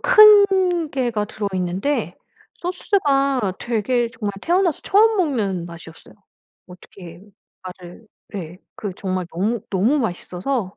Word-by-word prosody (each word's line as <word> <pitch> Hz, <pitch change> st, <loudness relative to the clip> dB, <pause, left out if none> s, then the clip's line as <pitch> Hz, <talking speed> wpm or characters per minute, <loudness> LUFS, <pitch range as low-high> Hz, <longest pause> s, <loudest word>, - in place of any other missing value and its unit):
큰 390 Hz, -7 st, +6 dB
게가 240 Hz, -6 st, -1 dB
들어있는데 195 Hz, +6 st, -2 dB, 0.4 s
소스가 275 Hz, -, 0 dB
되게 240 Hz, +1 st, 0 dB
정말 215 Hz, -4 st, -5 dB
태어나서 350 Hz, -2 st, +1 dB
처음 435 Hz, +2 st, +4 dB
먹는 210 Hz, -, -1 dB
맛이었어요. 165 Hz, -1 st, -13 dB, 0.5 s
어떻게 180 Hz, -1 st, -13 dB, 0.4 s
말을 185 Hz, +3 st, -11 dB, 0.2 s
네. 180 Hz, -2 st, -7 dB, 0.2 s
그 205 Hz, -3 st, -5 dB
정말 185 Hz, -2 st, -3 dB
너무, 205 Hz, +6 st, -1 dB
너무 215 Hz, +10 st, +2 dB
맛있어서 195 Hz, +1 st, -3 dB
225 Hz, 250 characters per minute, -21 LUFS, 185-300 Hz, 0.5 s, 큰